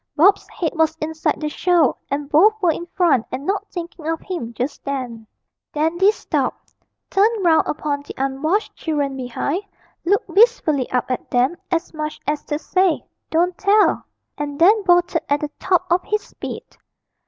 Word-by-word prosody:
Bob's 385 Hz, +7 st, +4 dB
head 330 Hz, -4 st, -2 dB
was 320 Hz, -1 st, +1 dB
inside 315 Hz, +1 st, -1 dB
the 305 Hz, -, -2 dB
show, 345 Hz, +2 st, +2 dB
and 285 Hz, +1 st, -2 dB
both 410 Hz, +10 st, +4 dB
were 355 Hz, -4 st, +3 dB
in 340 Hz, +2 st, -5 dB
front 335 Hz, -11 st, +2 dB
and 275 Hz, -, -5 dB
not 400 Hz, +3 st, -1 dB
thinking 340 Hz, -2 st, -7 dB
of 325 Hz, 0 st, -1 dB
him 340 Hz, -12 st, -5 dB
just 250 Hz, +5 st, -4 dB
then. 250 Hz, -5 st, -5 dB, 0.5 s
Dandy 340 Hz, +6 st, +3 dB
stopped, 435 Hz, -, -3 dB, 0.4 s
turned 415 Hz, 0 st, +2 dB
round 320 Hz, -2 st, +4 dB
upon 290 Hz, -1 st, -2 dB
the 285 Hz, -, -10 dB
unwashed 275 Hz, +10 st, -1 dB
children 290 Hz, -4 st, -2 dB
behind, 265 Hz, +7 st, -2 dB, 0.4 s
looked 400 Hz, +6 st, +1 dB
wistfully 385 Hz, -, +3 dB
up 250 Hz, 0 st, -1 dB
at 255 Hz, -, -3 dB
them, 250 Hz, +6 st, +2 dB
as 340 Hz, -1 st, -1 dB
much 305 Hz, -1 st, -4 dB
as 295 Hz, 0 st, -1 dB
to 295 Hz, -, -2 dB
say, 365 Hz, +2 st, +1 dB, 0.2 s
'Don't 350 Hz, +2 st, +1 dB
tell,' 410 Hz, +1 st, +3 dB, 0.4 s
and 290 Hz, -1 st, -4 dB
then 410 Hz, +7 st, +5 dB
bolted 350 Hz, -1 st, +3 dB
at 285 Hz, +1 st, +2 dB
the 300 Hz, -1 st, -3 dB
top 370 Hz, -2 st, +2 dB
of 350 Hz, +1 st, +4 dB
his 425 Hz, 0 st, -1 dB
speed. -, -, -7 dB
320 Hz, 165 wpm, -21 LUFS, 285-370 Hz, 0.5 s, then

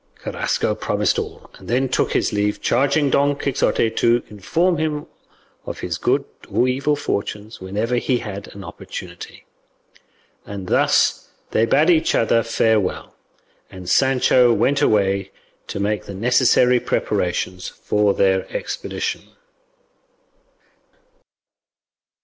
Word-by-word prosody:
Carrasco -, -, -1 dB
promised -, -, 0 dB
all, -, -, -8 dB
and -, -, -14 dB
then 125 Hz, +4 st, +1 dB
took 130 Hz, -, 0 dB
his -, -, 0 dB
leave, 105 Hz, 0 st, 0 dB
charging 140 Hz, +3 st, +2 dB
Don 145 Hz, +1 st, +3 dB
Quixote 125 Hz, -5 st, +1 dB
to 120 Hz, +1 st, +2 dB
inform 165 Hz, -, 0 dB
him 150 Hz, -2 st, -2 dB, 0.6 s
of -, -, -7 dB
his -, -, -3 dB
good -, -, +1 dB, 0.2 s
or 125 Hz, -, +2 dB
evil 135 Hz, +3 st, +1 dB
fortunes 105 Hz, -6 st, -4 dB
whenever 105 Hz, +6 st, -1 dB
he 125 Hz, +1 st, +1 dB
had 100 Hz, -3 st, -7 dB
an 100 Hz, -, -9 dB
opportunity; 85 Hz, -1 st, -9 dB, 1.0 s
and 100 Hz, -2 st, -7 dB
thus -, -, +2 dB, 0.2 s
they 115 Hz, +1 st, +2 dB
bade 150 Hz, +8 st, +4 dB
each 160 Hz, -2 st, +2 dB
other 115 Hz, 0 st, +3 dB
farewell, 110 Hz, -3 st, 0 dB, 0.5 s
and 95 Hz, -2 st, -10 dB
Sancho 130 Hz, +1 st, +4 dB
went 140 Hz, +4 st, +2 dB
away 100 Hz, -6 st, +2 dB, 0.4 s
to -, -, -5 dB
make 105 Hz, +1 st, -1 dB
the 100 Hz, -, -8 dB
necessary 125 Hz, +3 st, +3 dB
preparations 90 Hz, -5 st, -2 dB
for 105 Hz, -1 st, 0 dB
their 95 Hz, -1 st, +1 dB
expedition. -, -, -4 dB
115 Hz, 120 wpm, -21 LUFS, 100-135 Hz, 1.0 s, bade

